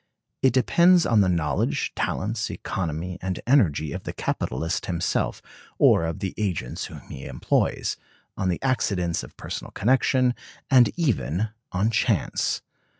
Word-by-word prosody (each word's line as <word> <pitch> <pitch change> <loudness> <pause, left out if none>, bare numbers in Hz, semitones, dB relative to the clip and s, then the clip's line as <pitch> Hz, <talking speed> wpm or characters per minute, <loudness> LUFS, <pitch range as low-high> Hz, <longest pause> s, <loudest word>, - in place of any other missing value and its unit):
It 130 - +5
depends 170 +8 +5
on 110 -3 +4
the 95 - +3
knowledge, 75 -5 0
talents, 105 +3 -2
economy, 85 0 -4
and 95 0 -3
energy 85 - +3
of - - -4
the - - -5
capitalist 80 +8 -2
himself, 85 -2 -1 0.3
or 85 - +5
of 85 +5 -4
the 95 -2 -2
agents 90 - -2
whom - - -9
he 65 - -9
employs; - - 0 0.4
on 95 - -1
the 90 - -1
accidents 95 -10 0
of - - -12
personal - - -6
connection; 125 +2 +2 0.4
and 125 -4 +7
even 105 - 0 0.2
on 100 +5 +1
chance. 110 - 0
95 Hz, 140 wpm, -25 LUFS, 85-125 Hz, 0.4 s, and